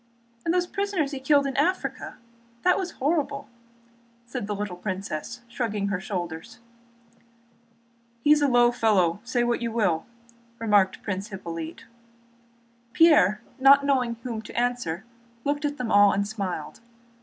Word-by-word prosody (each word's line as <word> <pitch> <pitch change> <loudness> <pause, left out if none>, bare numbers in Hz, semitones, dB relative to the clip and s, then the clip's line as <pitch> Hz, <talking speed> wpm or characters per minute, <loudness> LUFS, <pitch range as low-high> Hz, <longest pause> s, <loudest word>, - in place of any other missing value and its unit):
"And 330 - 0
the 355 0 +1
prisoners 390 -8 -1
he 275 - -4
killed 280 +1 +3
in 270 -2 -3
Africa? 355 +7 -1 0.5
That 360 - +4
was 365 -3 -4
horrible!" 280 -1 -1 0.8
said 240 -3 -5
the 210 - -2
little 205 -2 -4
princess, 190 +3 -5
shrugging 215 -4 -2
her 195 -2 -1
shoulders. 180 +2 -5 1.7
"He's 295 0 +5
a 290 - +4
low 240 -2 +5
fellow, 200 -7 +2
say 245 0 0
what 240 0 0
you 235 -1 -2
will," 185 -8 0 0.5
remarked 205 -4 +2
Prince 195 0 -3
Hippolyte. 170 -5 -7 1.1
Pierre, 255 - +5 0.2
not 280 +1 +7
knowing 255 -4 +1
whom 230 -3 -4
to 220 - -5
answer, 240 -8 -1 0.4
looked 290 +1 -1
at 290 0 -2
them 245 -3 -3
all 205 0 +6
and 200 0 0
smiled. 190 -8 -5
235 Hz, 140 wpm, -25 LUFS, 200-275 Hz, 1.7 s, not